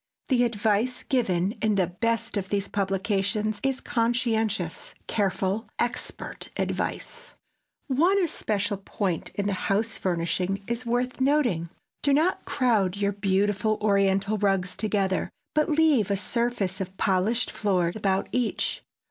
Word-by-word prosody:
The 245 -2 +4
advice 225 +2 0
given 190 -8 +1
in 215 -1 +2
the 190 -2 +3
best 230 +6 -1
of 195 -2 -2
these 200 -1 0
publications 200 +2 0
is 270 -1 0
conscientious, 225 -6 -1
careful, 200 +1 0
expert 240 0 -3
advice. 480 +1 -3 0.5
One 335 +9 +3
especial 210 - -1
point 195 -3 -2
in 200 0 -1
house 200 +3 0
furnishing 185 +2 -1
is 235 +2 -3
worth 245 +2 -1
noting. 255 - +2 0.3
Do 280 -1 +3
not 325 +5 +1
crowd 215 -9 +1
your 200 0 +1
beautiful 205 +2 +1
Oriental 200 0 +2
rugs 195 -2 +1
together, 200 -3 0 0.2
but 305 0 +2
leave 300 - +3
a 200 - +1
surface 205 -2 -1
of 190 0 -6
polished 200 +6 +1
floor 185 -5 +1
about 195 -3 0
each. 250 -3 0
205 Hz, 125 wpm, -26 LUFS, 195-240 Hz, 0.5 s, The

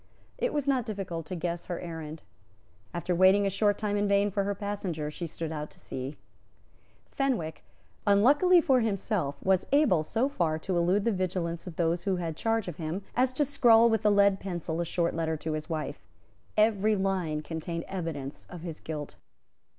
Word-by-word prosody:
It - - +1
was 290 -2 -1
not 255 -4 +1
difficult 185 -6 -4
to 185 - -4
guess 170 0 -3
her 175 - -4
errand. 160 -2 -7 0.7
After 175 +1 -2
waiting 190 +3 +5
a 195 - +1
short 205 +1 +2
time 205 -1 -1
in 205 0 +1
vain 200 0 +3
for 200 0 0
her 200 0 -1
passenger, 190 -7 -3
she 170 +2 -5
stood 160 0 -5
out 150 -1 -4
to - - -17
sea. 130 +3 -6 0.9
Fenwick, 235 - -1 0.4
unluckily 290 - +6
for 265 -6 +4
himself, 200 - -1
was 190 -1 +2
able 280 - +4
so 225 - 0
far 170 - 0
to 180 +3 -3
elude 180 +4 +2
the 230 - +3
vigilance 180 -3 -2
of 175 - -7
those 170 +2 0
who 195 -2 +2
had 165 -3 -3
charge 225 +3 0
of 175 - -5
him 165 +4 -4
as 255 +1 +3
to 290 +3 +1
scrawl 235 -4 +5
with 225 - +1
a 210 - +5
lead 200 -1 +4
pencil 170 -3 -3
a - - -1
short 170 0 0
letter 160 -1 -1
to 160 +1 -4
his 155 +2 -4
wife. 155 -2 -4 0.5
Every 215 0 +3
line 185 -6 -1
contained 165 +2 -4
evidence 160 -7 -5
of 175 - -8
his 165 -2 -6
guilt. 150 -2 -6
185 Hz, 190 wpm, -29 LUFS, 165-210 Hz, 0.9 s, unluckily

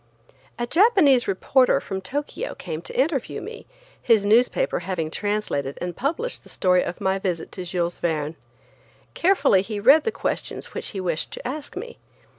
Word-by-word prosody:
A 240 - -1
Japanese 325 - +4
reporter 250 +7 +3
from 190 -1 -5
Tokyo 285 +9 -4
came 165 -3 -6
to - - -6
interview 275 -2 0
me, - - -9 0.3
his 225 -4 +3
newspaper 230 +4 +3
having 170 -3 -3
translated 205 -11 -2
and 175 -1 -4
published 340 - -2
the - - -17
story 180 -1 +2
of 175 - -4
my 190 0 0
visit 180 -4 -3
to 185 - -6
Jules 175 -1 -2
Verne. 155 -2 -1 0.8
Carefully 345 - +3
he 210 +1 -5
read 275 +9 +6
the 450 - 0
questions - - -3
which - - -3
he 195 - -5
wished 170 -4 -1
to - - -6
ask 290 +3 -6
me. 470 +5 -7
205 Hz, 165 wpm, -24 LUFS, 180-280 Hz, 0.8 s, read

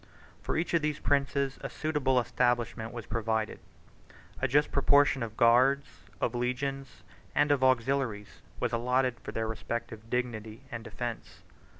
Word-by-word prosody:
For - - -2
each 165 +2 -1
of 170 - +4
these 150 -1 -1
princes 140 -1 0
a - - -4
suitable 145 -5 +1
establishment 120 -2 0
was 120 -3 -7
provided. 110 -1 -1 0.8
A 130 - +2
just 145 +4 +3
proportion 140 -1 +4
of 110 -2 -5
guards, 130 +3 +5 0.3
of 120 - 0
legions, 135 +3 -3 0.3
and 145 0 +3
of 140 -2 +2
auxiliaries, 130 -4 +1 0.2
was 125 -1 -1
allotted 125 +1 +1
for - - -7
their 115 0 -2
respective 110 0 -5
dignity 115 -3 -3
and 115 -1 -5
defence. 120 0 -6
125 Hz, 140 wpm, -30 LUFS, 115-140 Hz, 0.8 s, guards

